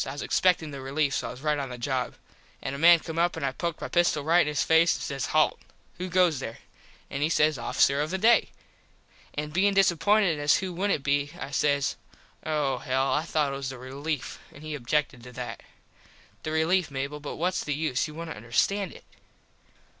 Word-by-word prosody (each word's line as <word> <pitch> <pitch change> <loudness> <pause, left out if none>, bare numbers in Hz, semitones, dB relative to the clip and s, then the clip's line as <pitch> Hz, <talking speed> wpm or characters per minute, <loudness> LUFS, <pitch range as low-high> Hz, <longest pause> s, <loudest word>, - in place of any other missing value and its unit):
I 135 - -5
was 145 - -5
expectin 170 -4 +2
the 140 -1 -7
relief 140 +1 0
so - - -1
I - - -5
was 125 - -9
right 150 -1 +1
on 135 -2 -4
the 125 - -7
job. 125 +1 -2 0.5
An 135 - -3
a 140 - -5
man 170 +1 +7
come 165 0 -5
up 175 +1 +1
and - - -2
I 135 - 0
poked 170 +3 -4
my - - -3
pistol 175 -4 +2
right 170 +4 +4
in - - 0
his 150 -1 0
face 165 +1 +4
an - - -7
says 140 -2 -3
Halt. 155 0 +2 0.4
Who 185 +1 -4
goes 175 -5 +3
there? 115 -3 -6 0.5
And 140 - -3
he 150 - +2
says 155 -3 +2
Officer 140 +4 +2
of 150 - -2
the 190 - -1
day. 225 +4 +4 0.9
An 150 +1 -3
bein 195 +4 +2
disappointed 195 -1 +3
as 145 0 +4
who 185 -1 -4
wouldnt 185 -5 0
be 145 0 +1
I 135 - -6
says 140 -1 +1 0.5
Oh 145 -5 0
hell. 130 +2 0
I 150 - +2
thought 155 -3 0
it - - -3
was 135 -1 -4
the 135 - -7
relief. 140 +3 -5
An 145 - -14
he 155 0 -5
objected 145 -1 -1
to 125 +1 -11
that. 125 0 -6 0.8
The - - -4
relief, 160 +3 +2
Mable 140 +2 -4
but 145 - -6
whats 180 +3 0
the 145 - -2
use 155 -2 -1
you 150 - -10
wouldnt 165 0 -6
understand 165 - 0
it. - - -14
150 Hz, 215 wpm, -27 LUFS, 140-170 Hz, 0.9 s, man